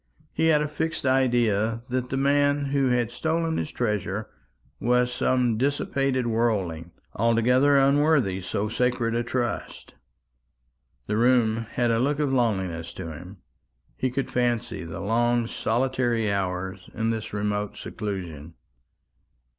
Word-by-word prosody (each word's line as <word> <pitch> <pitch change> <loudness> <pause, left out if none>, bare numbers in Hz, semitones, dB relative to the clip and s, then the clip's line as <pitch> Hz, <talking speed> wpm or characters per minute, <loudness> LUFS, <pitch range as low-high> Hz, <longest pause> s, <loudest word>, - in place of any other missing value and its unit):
He 160 - +2
had 150 -2 +4
a - - -1
fixed 160 0 -3
idea 120 -4 +2
that 125 0 -2
the 135 - -2
man 145 +1 +2
who 140 -2 +2
had 120 -2 +1
stolen 165 +2 -1
his - - -3
treasure 105 -3 -2 0.5
was 125 +2 +2
some 125 -3 +1
dissipated 135 -1 0
worldling, 105 -8 0 0.3
altogether 125 +5 +4
unworthy 140 -8 +3
so 100 +3 -2
sacred 120 0 0
a 120 - +1
trust. 120 0 -3 1.1
The 105 - -1
room 115 -2 +3
had 120 -1 +1
a 115 - +2
look 140 +3 +1
of 145 -3 0
loneliness 95 -9 -1
to 85 -3 -6
him. 90 +4 -11 0.5
He 130 - -1
could 130 +2 -3
fancy 120 -6 -1
the 80 +2 -7
long 120 +3 +1
solitary 120 -1 0
hours 95 -1 -3
in 115 0 0
this 110 -1 -4
remote 105 0 -2
seclusion. 85 -7 -6
120 Hz, 130 wpm, -25 LUFS, 105-130 Hz, 1.1 s, had